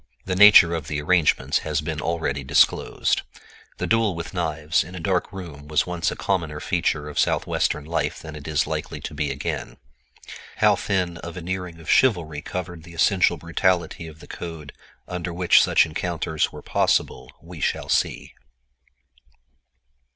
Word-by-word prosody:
The 95 Hz, -, -1 dB
nature 100 Hz, -4 st, +8 dB
of 80 Hz, -3 st, -4 dB
the 75 Hz, 0 st, -2 dB
arrangements 75 Hz, -4 st, +2 dB
has 75 Hz, -2 st, -2 dB
been 75 Hz, -1 st, -4 dB
already 80 Hz, -5 st, -2 dB
disclosed. 70 Hz, +2 st, +2 dB, 0.6 s
The -, -, -2 dB
duel 115 Hz, -4 st, +2 dB
with 85 Hz, +2 st, -6 dB
knives 80 Hz, -3 st, 0 dB
in 90 Hz, +3 st, -11 dB
a -, -, -6 dB
dark 90 Hz, +1 st, -1 dB
room 85 Hz, -7 st, -9 dB
was 75 Hz, 0 st, +1 dB
once 90 Hz, -2 st, -1 dB
a -, -, -5 dB
commoner 80 Hz, -6 st, -2 dB
feature 75 Hz, 0 st, -1 dB
of 75 Hz, -, -4 dB
Southwestern 75 Hz, -, 0 dB
life 80 Hz, -1 st, -2 dB
than 80 Hz, -1 st, -9 dB
it 75 Hz, -1 st, -9 dB
is 75 Hz, -2 st, +1 dB
likely -, -, -4 dB
to -, -, -6 dB
be 75 Hz, 0 st, -2 dB
again. 70 Hz, 0 st, -4 dB, 0.8 s
How -, -, +4 dB
thin 90 Hz, -4 st, -1 dB
a 85 Hz, -, -6 dB
veneering 90 Hz, 0 st, -5 dB
of 80 Hz, -, -14 dB
"chivalry" 85 Hz, -, +2 dB
covered 90 Hz, 0 st, -6 dB
the 85 Hz, +1 st, -13 dB
essential 90 Hz, 0 st, +3 dB
brutality 85 Hz, +1 st, -1 dB
of 80 Hz, -1 st, -13 dB
the -, -, -13 dB
code 80 Hz, -4 st, -8 dB, 0.3 s
under 90 Hz, -1 st, -4 dB
which 90 Hz, +1 st, +5 dB
such -, -, +4 dB
encounters 80 Hz, -1 st, -2 dB
were -, -, -10 dB
possible -, -, 0 dB
we 85 Hz, 0 st, -11 dB
shall -, -, -1 dB
see. -, -, -1 dB
85 Hz, 160 wpm, -23 LUFS, 75-90 Hz, 0.8 s, nature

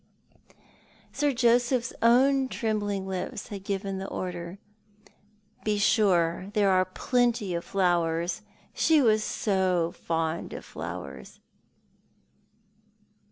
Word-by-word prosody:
Sir 290 Hz, -1 st, +1 dB
Joseph's 245 Hz, 0 st, +2 dB
own 265 Hz, +3 st, +4 dB
trembling 205 Hz, -5 st, -2 dB
lips 190 Hz, -1 st, -5 dB
had 200 Hz, -2 st, -7 dB
given 195 Hz, -1 st, -3 dB
the 195 Hz, -, -5 dB
order. 175 Hz, -1 st, -5 dB, 1.1 s
"Be 210 Hz, -1 st, 0 dB
sure 185 Hz, -4 st, +2 dB
there 200 Hz, -2 st, +4 dB
are 185 Hz, 0 st, +3 dB
plenty 235 Hz, 0 st, 0 dB
of 170 Hz, 0 st, -2 dB
flowers. 175 Hz, -1 st, 0 dB, 0.3 s
She 320 Hz, -1 st, +4 dB
was 215 Hz, -5 st, +3 dB
so 185 Hz, -6 st, 0 dB
fond 165 Hz, 0 st, -3 dB
of -, -, -8 dB
flowers." 65 Hz, -2 st, -8 dB
195 Hz, 100 wpm, -27 LUFS, 175-230 Hz, 1.1 s, own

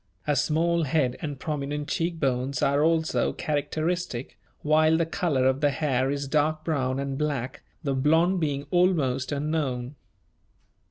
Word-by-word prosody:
A 145 Hz, -, +1 dB
small 165 Hz, +4 st, +1 dB
head 130 Hz, -3 st, +1 dB
and 145 Hz, -5 st, -5 dB
prominent 145 Hz, 0 st, -3 dB
cheek 165 Hz, 0 st, -1 dB
bones 130 Hz, -1 st, 0 dB
are 140 Hz, +2 st, +3 dB
also 160 Hz, 0 st, +1 dB
characteristic, 155 Hz, -1 st, -2 dB, 0.3 s
while 155 Hz, +1 st, +4 dB
the 165 Hz, -, +1 dB
colour 160 Hz, -6 st, 0 dB
of 130 Hz, +1 st, +2 dB
the 145 Hz, -, +4 dB
hair 135 Hz, -2 st, 0 dB
is 140 Hz, 0 st, -2 dB
dark 155 Hz, +2 st, +1 dB
brown 135 Hz, -5 st, -1 dB
and 140 Hz, 0 st, -3 dB
black, 145 Hz, -5 st, -2 dB, 0.2 s
the 140 Hz, -2 st, 0 dB
blond 160 Hz, +7 st, +3 dB
being 145 Hz, -3 st, -1 dB
almost 155 Hz, -8 st, +2 dB
unknown. 140 Hz, -4 st, -2 dB
145 Hz, 145 wpm, -26 LUFS, 135-160 Hz, 0.3 s, while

